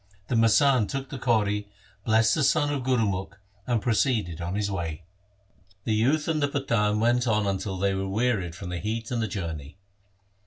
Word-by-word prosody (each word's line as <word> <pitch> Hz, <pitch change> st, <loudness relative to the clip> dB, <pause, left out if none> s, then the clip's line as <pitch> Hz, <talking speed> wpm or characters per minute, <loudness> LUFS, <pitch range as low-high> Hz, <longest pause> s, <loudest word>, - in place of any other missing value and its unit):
The 125 Hz, -, +1 dB
masand 115 Hz, +1 st, +4 dB
took 135 Hz, -1 st, -4 dB
the 135 Hz, -, -6 dB
kauri, 105 Hz, -4 st, +1 dB, 0.4 s
blessed 110 Hz, 0 st, +4 dB
the 155 Hz, -, +1 dB
son 145 Hz, +1 st, +2 dB
of 140 Hz, -, -2 dB
Gurumukh, 105 Hz, -7 st, 0 dB, 0.3 s
and 120 Hz, -4 st, 0 dB
proceeded 110 Hz, -, 0 dB
on 85 Hz, +3 st, -3 dB
his 100 Hz, -1 st, -1 dB
way. 85 Hz, -3 st, -4 dB, 0.8 s
The 110 Hz, -, 0 dB
youth 135 Hz, +8 st, +2 dB
and 155 Hz, -2 st, 0 dB
the 145 Hz, -, +3 dB
Pathan 115 Hz, -7 st, 0 dB
went 120 Hz, +2 st, +2 dB
on 105 Hz, -2 st, +2 dB
until 95 Hz, 0 st, -2 dB
they 100 Hz, +1 st, +1 dB
were 95 Hz, 0 st, -2 dB
wearied 100 Hz, -5 st, 0 dB
from 90 Hz, 0 st, -7 dB
the 90 Hz, -1 st, -3 dB
heat 115 Hz, +4 st, -4 dB
and 120 Hz, -2 st, 0 dB
the 110 Hz, -, 0 dB
journey. 80 Hz, -5 st, -6 dB
110 Hz, 185 wpm, -26 LUFS, 95-125 Hz, 0.8 s, masand